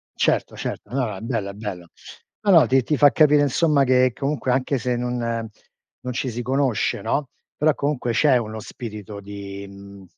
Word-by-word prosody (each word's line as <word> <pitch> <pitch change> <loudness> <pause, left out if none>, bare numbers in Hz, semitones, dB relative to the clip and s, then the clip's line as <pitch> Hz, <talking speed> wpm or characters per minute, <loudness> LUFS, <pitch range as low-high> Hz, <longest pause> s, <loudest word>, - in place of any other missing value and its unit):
Certo, - - 0
certo, 105 - -6
no, 135 -1 +1
no, 105 -3 -4
è - - -10
bello 115 -4 -2
è - - -7
bello. 100 -5 -7 0.5
No, 205 - +2
no, 165 -4 +7
ti 130 0 +3
ti 150 +4 0
fa 145 0 +6
capire 150 -2 +5
insomma 145 +1 +3
che 130 -1 +3
comunque 135 -1 -2
anche 130 +2 +1
se 125 0 -1
non 120 -2 -2 0.6
non 125 - -4
ci 130 +1 -2
si 120 +2 -4
conosce, 125 -3 0
no, 140 +6 -1 0.3
però 155 +1 +3
comunque 140 -4 -1
c'è 130 +3 +4
uno 110 -2 -4
spirito 105 -2 -8
di, 100 0 -8
mhmm, 100 0 -13
125 Hz, 190 wpm, -23 LUFS, 105-140 Hz, 0.6 s, no